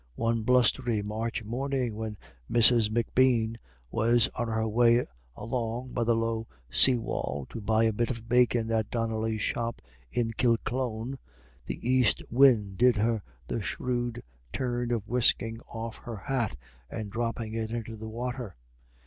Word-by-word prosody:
One 115 +4 0
blustery 120 -2 +3
March 110 +2 -3
morning 125 +1 -2
when 110 -1 -5 0.3
Mrs. 115 -2 +5
M'Bean 115 0 +2 0.3
was 115 +1 +3
on 120 -1 -3
her 110 0 0
way 120 +2 +4 0.3
along 120 +1 -3
by 120 - 0
the 115 0 +3
low 115 0 -1 0.2
sea 125 - +5
wall 70 - -3
to 115 - -6
buy 110 +2 +2
a 110 -1 +3
bit 120 +3 0
of 115 -3 -5
bacon 120 -1 +3
at 110 -2 0
Donnelly's 110 -2 -1
shop 115 0 -2 0.3
in 115 -2 0
Kilclone, 120 +1 -1 0.5
the - - -5
east 130 -2 +3
wind 115 -7 +4
did 125 -2 +5
her 110 +1 +1 0.3
the 115 - -2
shrewd 120 +2 -2 0.3
turn 120 -1 -2
of 115 -3 -1
whisking 115 -1 +2
off 115 0 -6
her 115 -2 -7
hat 130 -2 -2 0.3
and 105 +2 -5
dropping 115 -1 -3
it 110 -1 -2
into 115 -1 -4
the 110 0 -7
water. 120 -2 -5
115 Hz, 150 wpm, -28 LUFS, 110-120 Hz, 0.5 s, Mrs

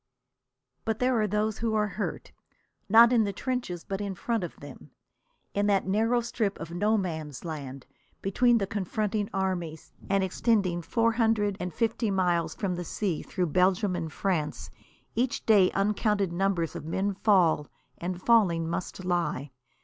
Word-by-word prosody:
But 220 -1 -1
there 250 -2 +2
are 210 - +1
those 210 +1 -1
who 225 -1 0
are 210 -1 +1
hurt, 200 +2 -5 0.6
not 230 +3 +8
in 230 -2 +5
the 200 - -1
trenches 200 -6 -3
but 195 +1 -4
in 200 -2 -3
front 225 +3 -1
of 175 - -6
them. - - -11 0.6
In 205 0 +1
that 200 -2 +2
narrow 225 +5 +2
strip 225 -3 -2
of 165 0 -7
No 210 +6 +2
Man's 160 -6 -4
Land 140 -5 -6 0.3
between 240 +5 +3
the 200 - 0
confronting 205 +1 -2
armies, 180 -5 -3 0.2
and 195 0 +2
extending 190 -2 +1
four 230 +7 +1
hundred 220 -3 +1
and 180 0 -3
fifty 225 +4 0
miles 175 -4 +1
from 195 -4 -2
the 175 - -3
sea 180 -1 -2
through 180 -5 -2
Belgium 185 +1 +3
and 165 -2 -4
France, 150 - -2 0.4
each 245 +2 -1
day 205 -5 +6
uncounted 200 -2 +1
numbers 175 -3 0
of 170 - -5
men 190 +6 -1
fall, 180 -7 +3 0.3
and, 180 +1 -3
falling, 180 -9 +3
must 180 +2 -4
lie. 165 -6 -1
195 Hz, 160 wpm, -28 LUFS, 175-215 Hz, 0.6 s, not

